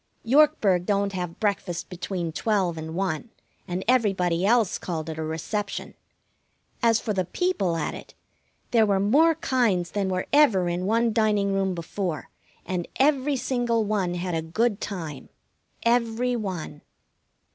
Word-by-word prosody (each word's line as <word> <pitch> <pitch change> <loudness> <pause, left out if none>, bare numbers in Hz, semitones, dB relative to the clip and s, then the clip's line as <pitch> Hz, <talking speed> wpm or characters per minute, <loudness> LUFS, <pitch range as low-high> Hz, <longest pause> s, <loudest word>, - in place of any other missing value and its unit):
Yorkburg 230 - +4
don't 200 -1 +1
have 180 -2 -4
breakfast 200 -5 -1
between 180 -2 -4
twelve 190 -1 0
and 160 0 -6
one, 190 +2 -2 0.4
and 180 +1 -3
everybody 190 -8 +2
else 225 -1 +3
called 165 -3 -4
it 160 - -7
a - - -2
reception. 195 +6 -4 0.9
As 230 -2 +4
for 215 - -2
the 190 -2 0
people 200 - 0
at 155 - -2
it, - - -11 0.6
there 225 -3 +4
were 200 -1 +2
more 295 +12 +4
kinds 230 - +1
than 200 -2 -1
were 185 0 -1
ever 225 -12 +5
in 175 +2 -2
one 230 +1 +2
dining 210 -3 +2
room 195 -1 0
before; 170 -1 -4 0.3
and 180 -2 -3
every 280 0 +2
single 240 -3 0
one 200 -4 -1
had 175 0 -3
a 165 - 0
good 210 +7 0
time. 160 -8 -6 0.6
Every 240 +1 +2
one. 185 -9 -5
195 Hz, 145 wpm, -25 LUFS, 175-230 Hz, 0.9 s, ever